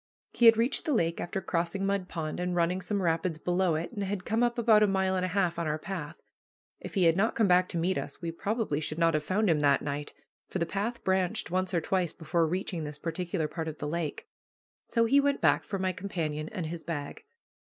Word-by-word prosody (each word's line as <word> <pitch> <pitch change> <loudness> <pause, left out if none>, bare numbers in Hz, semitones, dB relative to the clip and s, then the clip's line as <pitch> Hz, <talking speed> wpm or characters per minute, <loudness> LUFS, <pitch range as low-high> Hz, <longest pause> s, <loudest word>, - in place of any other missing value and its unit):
He 235 - +5
had 225 -1 +8
reached 235 +8 +1
the 300 -5 +1
lake 165 -5 0
after 190 +2 -3
crossing 175 +3 -1
Mud 195 -2 0
Pond 155 -2 -4
and 180 0 -1
running 175 +2 +1
some 195 +2 -2
rapids 165 0 0
below 175 0 +1
it, 160 +2 -3
and 205 -4 -4
had 190 -2 -3
come 225 +2 0
up 240 0 +1
about 225 -2 +5
a 210 - +5
mile 190 -1 +1
and 185 - 0
a - - +1
half 180 -2 0
on 170 - -1
our 150 0 0
path. 165 -2 -6 0.6
If - - -9
he 190 - +3
had 165 -1 +5
not 210 +5 +1
come 220 - +3
back 180 0 +4
to 175 - -3
meet 180 +3 +1
us, - - -7
we 170 -2 -3
probably 200 -3 -1
should 155 0 -3
not 165 -1 +3
have 155 0 0
found 200 +7 +1
him 160 -4 +3
that 145 -1 +3
night, 145 0 -4 0.4
for - - -4
the 170 - 0
path 205 +7 -3
branched 190 -3 0
once 185 0 0
or 170 -3 +1
twice 180 -2 0
before 165 0 0
reaching 180 -1 -2
this 150 0 -6
particular 165 +1 -2
part 160 0 -5
of 155 -1 -5
the 145 - -4
lake. 160 0 -3 0.6
So 230 -1 +2
he 275 +5 +5
went 280 0 +1
back - - +3
for 200 - -4
my 185 0 0
companion 160 -5 -3
and 185 -6 -4
his 165 +1 -5
bag. 160 - -5
180 Hz, 240 wpm, -29 LUFS, 165-195 Hz, 0.6 s, had